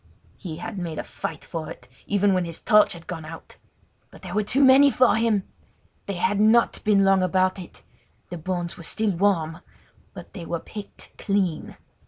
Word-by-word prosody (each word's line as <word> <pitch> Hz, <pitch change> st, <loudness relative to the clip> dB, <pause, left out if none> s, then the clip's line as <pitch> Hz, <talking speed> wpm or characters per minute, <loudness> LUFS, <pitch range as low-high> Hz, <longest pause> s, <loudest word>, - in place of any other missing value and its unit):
He 170 Hz, -6 st, -6 dB
had 205 Hz, +3 st, -6 dB
made 165 Hz, -3 st, -5 dB
a -, -, -3 dB
fight 160 Hz, -, -7 dB
for 160 Hz, -2 st, -6 dB
it, 125 Hz, -, -11 dB, 0.2 s
even 205 Hz, -1 st, +2 dB
when 185 Hz, -1 st, +1 dB
his 165 Hz, -1 st, -6 dB
torch 210 Hz, -2 st, +4 dB
had 170 Hz, -1 st, -12 dB
gone 165 Hz, -3 st, -6 dB
out. 160 Hz, +1 st, -11 dB, 0.5 s
But -, -, -17 dB
they -, -, -7 dB
were 215 Hz, -, +1 dB
too 250 Hz, +7 st, +1 dB
many 270 Hz, +2 st, +7 dB
for 255 Hz, -2 st, +3 dB
him! 220 Hz, -3 st, +1 dB, 0.6 s
They 200 Hz, -, -3 dB
had 195 Hz, +3 st, 0 dB
not 220 Hz, +2 st, +3 dB
been 200 Hz, -2 st, +3 dB
long 195 Hz, -1 st, +4 dB
about 185 Hz, +1 st, +1 dB
it! 180 Hz, -, -12 dB, 0.5 s
The 175 Hz, -, -5 dB
bones 175 Hz, 0 st, -4 dB
were -, -, -10 dB
still 215 Hz, +5 st, -1 dB
warm; 170 Hz, -3 st, 0 dB, 0.6 s
but -, -, -11 dB
they 180 Hz, -, -7 dB
were 170 Hz, 0 st, -3 dB
picked 205 Hz, +4 st, -11 dB
clean. 195 Hz, -5 st, -1 dB
190 Hz, 190 wpm, -24 LUFS, 170-210 Hz, 0.6 s, many